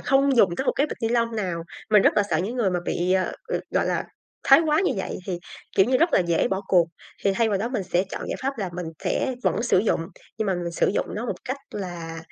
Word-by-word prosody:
không 275 0 +3
dùng 185 -7 +4
tới 265 - -1
một - - +3
cái 285 - +3
bịch - - -6
ni 225 - +2
lông 230 -1 +1
nào. 180 -5 -2 0.3
Mình 210 -2 +6
rất - - +4
là 210 - +5
sợ 155 - +2
những 210 +9 -2
người 215 -6 +2
mà 180 -1 -1
bị, 180 +2 0
ờ, 190 -1 +1 0.4
gọi - - +1
là, - - 0 0.4
thái 275 +3 +8
quá 305 +2 +3
như 375 - +2
vậy 190 - -3
thì, 180 -3 -2 0.4
kiểu 190 - +6
như, 255 +1 +3
rất 335 +1 +3
là - - +5
dễ 170 -2 +1
bỏ 190 0 -1
cuộc. 175 -3 +4 0.4
Thì 200 - +4
thay 230 +2 +2
vào 200 -2 +1
đó 220 +4 -1
mình 245 -5 -2
sẽ 180 +1 +1
chọn - - -5
giải - - -2
pháp 270 -1 -2
là 195 -4 -2
mình 175 -1 -4 0.2
sẽ 260 - 0
vẫn 225 - +1
sử 235 -6 +3
dụng, 205 -4 +1 0.4
nhưng 220 - 0
mà 190 - +1
mình 175 -1 -3
sử - - +2
dụng - - 0
nó 225 +4 -3
một - - -5
cách 260 - -2
là 175 -4 -6
200 Hz, 275 wpm, -24 LUFS, 180-245 Hz, 0.4 s, thái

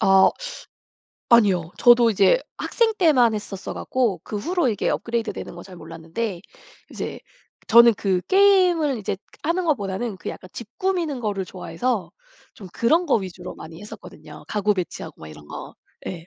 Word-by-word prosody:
아. 195 0 +6 1.0
아니요. 195 -8 +4
저도 240 -1 +6
이제 200 - +4 0.2
학생 460 -2 +1
때만 255 - +4
했었어 205 -2 -6
갖고 235 -9 -1
그 210 - -3
후로 335 - 0
이게 215 -4 -1
업그레이드되는 230 -5 -3
거 175 - -9
잘 185 - -12
몰랐는데 170 +5 -5 0.5
이제 - - -5 0.5
저는 235 0 +7
그 190 -3 0
게임을 365 -8 +4
이제 195 -2 -3
그 195 - -37 0.2
하는 340 +4 0
것보다는 210 - -1
그 165 - -7
약간 185 - -8
집 235 - -8
꾸미는 350 -7 -1
거를 205 -4 -2
좋아해서 185 +5 -3 0.4
좀 195 - -11
그런 325 +10 +2
거 285 - +3
위주로 185 -3 -6
많이 160 +2 -11
했었거든요. 210 - -12
가구 210 0 +1
배치하고 170 -4 -6
막 80 - -8
이런 75 -1 -13
거. - - -8 0.3
예. 170 -2 -6
215 Hz, 330 characters per minute, -23 LUFS, 190-260 Hz, 1.0 s, 저는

